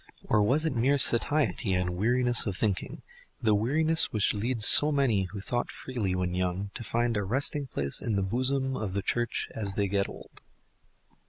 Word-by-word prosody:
Or 105 Hz, -, +1 dB
was 135 Hz, +10 st, +1 dB
it 155 Hz, -, -2 dB
mere 130 Hz, +5 st, +1 dB
satiety 120 Hz, -5 st, +2 dB
and 90 Hz, -1 st, -2 dB
weariness 120 Hz, +4 st, +1 dB
of 95 Hz, -2 st, -4 dB
thinking—the 115 Hz, -, -4 dB
weariness 155 Hz, +10 st, +1 dB
which 105 Hz, -2 st, 0 dB
leads 110 Hz, +1 st, +1 dB
so 150 Hz, +1 st, +9 dB
many 125 Hz, -9 st, 0 dB
who 100 Hz, +2 st, -9 dB
thought 120 Hz, +4 st, -3 dB
freely 110 Hz, -8 st, -4 dB
when 90 Hz, -1 st, -3 dB
young 90 Hz, +2 st, -3 dB
to -, -, -7 dB
find 120 Hz, +1 st, -2 dB
a 105 Hz, -, -1 dB
resting 135 Hz, +6 st, 0 dB
place 70 Hz, -, -2 dB
in 115 Hz, -3 st, -3 dB
the 100 Hz, -, -1 dB
bosom 130 Hz, +5 st, -1 dB
of 105 Hz, -5 st, -5 dB
the 100 Hz, -, -3 dB
Church 120 Hz, 0 st, -2 dB
as 100 Hz, -3 st, -5 dB
they 100 Hz, -1 st, -1 dB
get 100 Hz, 0 st, -2 dB
old? -, -, -13 dB
115 Hz, 180 wpm, -27 LUFS, 100-130 Hz, -, so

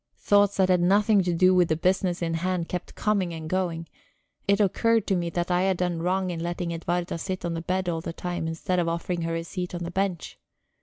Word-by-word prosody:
Thoughts 205 Hz, -1 st, +3 dB
that 190 Hz, -1 st, +3 dB
had 180 Hz, -1 st, +4 dB
nothing 205 Hz, +3 st, +4 dB
to 180 Hz, -1 st, 0 dB
do 185 Hz, +2 st, +5 dB
with 180 Hz, -2 st, +4 dB
the 160 Hz, -, +2 dB
business 180 Hz, +1 st, 0 dB
in 165 Hz, -1 st, -1 dB
hand 175 Hz, 0 st, -1 dB
kept 180 Hz, -, -5 dB
coming 195 Hz, -5 st, 0 dB
and 160 Hz, -1 st, -7 dB
going; 170 Hz, -2 st, -2 dB, 0.6 s
it 200 Hz, +1 st, +3 dB
occurred 225 Hz, +2 st, +2 dB
to 195 Hz, -, +1 dB
me 170 Hz, -1 st, -1 dB
that 175 Hz, +1 st, -2 dB
I 180 Hz, 0 st, +3 dB
had 190 Hz, -1 st, +1 dB
done 175 Hz, -2 st, -1 dB
wrong 185 Hz, +1 st, 0 dB
in 170 Hz, -, -4 dB
letting 175 Hz, 0 st, -3 dB
Edwarda 170 Hz, +1 st, -2 dB
sit 185 Hz, 0 st, -4 dB
on 170 Hz, -, -1 dB
the 165 Hz, -, -3 dB
bed 185 Hz, +2 st, -1 dB
all 165 Hz, -2 st, -1 dB
the 165 Hz, -, -5 dB
time, 175 Hz, -1 st, -4 dB
instead 165 Hz, +3 st, -1 dB
of 170 Hz, -, 0 dB
offering 170 Hz, +1 st, -2 dB
her 165 Hz, 0 st, -2 dB
a 165 Hz, -, -2 dB
seat 180 Hz, 0 st, -5 dB
on 175 Hz, -, -4 dB
the 170 Hz, -, -5 dB
bench. 190 Hz, -3 st, -2 dB
180 Hz, 240 wpm, -26 LUFS, 170-185 Hz, 0.6 s, do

